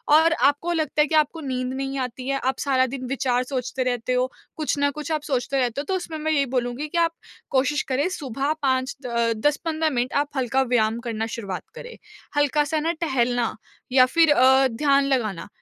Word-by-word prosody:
और 325 +1 +5
आपको 305 +3 +2
लगता 315 -2 +1
है 300 - +3
कि 315 - 0
आपको 310 +1 +2
नींद 255 -2 -3
नहीं 270 +1 -3
आती 255 0 -4
है, 275 0 0
आप 260 +1 -1
सारा 260 -2 +2
दिन 260 0 -6
विचार 250 -1 0
सोचते 255 0 -3
रहते 250 0 -1
हो, 250 +1 +1 0.2
कुछ 305 -2 -1
ना 285 0 +2
कुछ 300 +1 -5
आप 310 -1 0
सोचते 265 +1 0
रहते 250 +1 0
हो, - - -7
तो 380 - -1
उसमें 330 -3 -4
मैं 310 +1 -1
यही 285 -3 +2
बोलूँगी 245 +4 -1
कि 325 - -4
आप 335 -1 +2 0.4
कोशिश 280 +3 +1
करें 280 +5 +1
सुबह 275 +2 -2
5 260 -1 0
द - - -4
अ, 235 -1 +1
10-15 315 +1 0
मिनट 250 -2 -1
आप 290 - -16
हल्का 260 +1 +1
व्यायाम 230 -3 +1
करना 225 -2 -3
शुरुआत 195 -5 -5
करें। 485 -1 -9 0.4
हल्का-सा 295 +2 +2
ना 325 +2 0
टहलना 245 -6 0 0.4
या 255 0 +7
फिर 330 -2 +5
अ, 265 -1 +5
ध्यान 275 +3 +2
लगाना, 225 -10 -1
270 Hz, 205 wpm, -24 LUFS, 250-300 Hz, 0.4 s, या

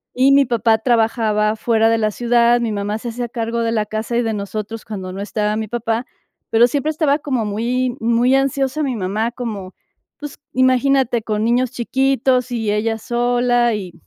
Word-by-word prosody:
y 260 +2 +4
mi 275 0 +5
papá 230 -2 +2
trabajaba 220 -2 +1
fuera 225 0 +2
de 225 0 +2
la 215 -1 +1
ciudad, 240 +1 +2
mi 230 -2 -1
mamá 205 +1 -2
se 235 +2 -6
hacía 240 +1 -4
cargo 230 0 -3
de 230 0 0
la 215 -2 0
casa 220 +3 -3
y 240 - +1
de 225 - -1
nosotros 215 +2 -5
cuando 190 -4 -6
no 195 - -6
estaba 210 0 -1
mi 220 0 -3
papá, 230 +1 -2 0.4
pero 230 +1 +5
siempre 285 +3 -1
estaba 305 -2 +1
como 260 -7 -2
muy 240 +4 -1
muy 235 +3 +2
ansiosa 270 +2 0
mi 265 -4 -1
mamá, 210 +3 -1
como, 210 -7 -6 0.4
pues, 295 -1 -9
imagínate, 260 -1 +2
con 215 -1 -2
niños 240 +2 +2
chiquitos 260 0 +1
y 225 -3 -1
ella 220 +2 0
sola, 240 0 +1
y 185 -4 -6
235 Hz, 185 wpm, -19 LUFS, 215-250 Hz, 0.4 s, mi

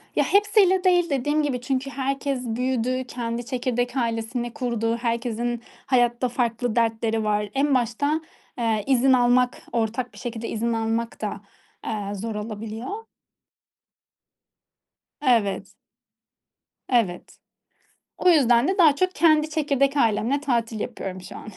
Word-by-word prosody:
Ya, - - +3
hepsiyle 400 -2 +3
değil 355 -2 +3
Dediğim 295 +3 +1
gibi, 260 -4 -1
çünkü 265 +1 -2
herkes 275 -1 -2
büyüdü, 255 +2 -1
kendi 235 -1 -4
çekirdek 245 0 -2
ailesini 235 0 -2
kurdu, 235 -4 -1
herkesin 235 0 -2 0.2
hayatta 245 -1 +2
farklı 240 -1 -1
dertleri 225 -1 +1
var. 210 -1 0
En 275 0 +2
başta, 270 +6 0 0.4
ııı, 225 -2 +1
izin 265 0 +4
almak, 250 0 +3
ortak 235 +2 -2
bir - - -15
şekilde 235 -2 -5
izin 230 +1 -1
almak 225 +1 -2
da, 205 -2 -4 0.4
aaa, 205 -2 -3
zor 220 +2 -4
olabiliyor. 225 - -6 2.1
Evet. 205 -7 +1 1.2
Evet. 225 -8 0 0.8
O 365 - +2
yüzden 250 -4 +4
de 385 - 0
daha 310 -5 +6
çok 370 +2 0
kendi 310 -1 +4
çekirdek 280 -2 +1
ailemle 230 +3 +2
tatil 235 -6 -1
yapıyorum 190 -6 -5
şu - - -10
an. - - -10
245 Hz, 125 wpm, -24 LUFS, 225-275 Hz, 2.1 s, daha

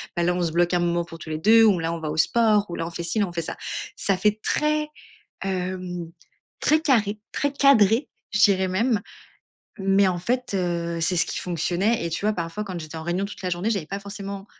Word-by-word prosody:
bah 175 - 0
là, 175 +1 +2
on 180 - 0
se 165 - 0
bloque 175 +1 +2
un - - +2
moment 175 0 +1
pour 165 - -10
tous 160 - -10
les 155 - -2
2 225 +5 +6
ou 200 -6 +5
là, 165 0 -1
on 170 - -4
va 155 -1 -3
au 155 - -5
sport 210 +4 +3
ou 170 - -4
là, 165 - -3
on 170 - -6
fait 170 - -5
ci, 170 +6 -2
là 200 - +2
on - - -8
fait 170 - -2
ça. - - -6 0.4
Ça 195 - +1
fait 210 +3 +1
très, 300 0 +1 0.5
hem, 180 -2 -3 0.5
très 310 +1 +3
carré, 215 -8 +2
très 285 -1 0
cadré, 245 -3 +4 0.2
je 210 - +1
dirais 190 -2 +4
même, 210 +3 +1 0.8
mais 195 0 +3
en 175 -1 -1
fait, 245 +3 -2
heu, 170 -2 -1
c'est 180 +2 +1
ce - - +3
qui - - -4
fonctionnait, 180 +5 0
et 170 - -2
tu 165 - -3
vois? 215 - +3
Parfois, 170 +5 -4
quand 185 -3 -5
j'étais 155 +1 -8
en 160 - -5
réunion 175 +3 -1
toute 205 - -10
la 180 - -2
journée, 180 +6 -1
j'avais 195 -8 -1
pas 195 +2 -5
forcément, 200 0 -7
190 Hz, 240 wpm, -24 LUFS, 170-210 Hz, 0.8 s, 2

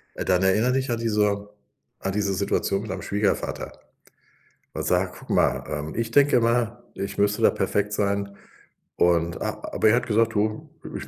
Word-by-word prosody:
Äh, - - -4
dann 90 -1 +2
erinnere 105 +7 +3
dich 135 0 -1
an 120 - 0
diese 105 -2 0 0.5
an 95 - -2
diese 100 -1 0
Situation 100 0 0
mit 110 - -8
deinem 95 0 -5
Schwiegervater. 100 0 -1 1.0
Und - - -3
sag: - - +1
„Guck - - -9
mal, 65 +1 +2
ähm, 75 0 -5
ich 115 0 -2
denke 140 -1 +5
mal, 115 0 0
ich 100 0 -5
müsste 100 0 +1
da - - +6
perfekt 105 0 -1
sein.“ 100 -1 -1 0.6
Und 85 -1 +2
a - - -3
aber 110 - +3
er 110 - +5
hat 125 +1 0
gesagt: 115 0 +2
„Du, 110 +1 -1 0.3
ich - - -6
105 Hz, 180 wpm, -24 LUFS, 100-115 Hz, 1.0 s, da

